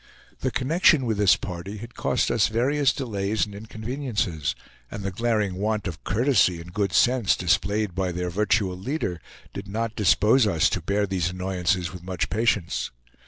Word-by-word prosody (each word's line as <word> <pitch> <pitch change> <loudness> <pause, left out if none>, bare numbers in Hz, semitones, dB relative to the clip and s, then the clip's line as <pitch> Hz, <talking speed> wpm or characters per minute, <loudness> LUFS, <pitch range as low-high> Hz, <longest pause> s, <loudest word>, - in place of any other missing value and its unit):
The - - 0
connection 155 0 +3
with 110 -3 0
this 100 -2 +5
party 90 +3 -6
had 115 +3 -9
cost - - 0
us - - +3
various 135 +5 +2
delays 105 -5 -1
and 105 - -11
inconveniences; 110 - -3 0.3
and 105 - -6
the 100 - -2
glaring 105 -2 0
want 105 +1 -1
of 85 -3 -7
courtesy 105 -4 +2
and 85 +1 -11
good 100 -1 0
sense 120 +2 +3
displayed 100 +3 0
by 95 0 -1
their 90 0 -3
virtual 100 -1 +1
leader 95 - -3 0.3
did 100 +1 -7
not 110 +2 -3
dispose 110 +3 +4
us 85 -6 +2
to - - -1
bear 100 +1 0
these 90 -3 -1
annoyances 90 -2 -1
with 90 - -8
much 90 -2 -3
patience. 105 -4 0
100 Hz, 165 wpm, -25 LUFS, 90-115 Hz, 0.3 s, this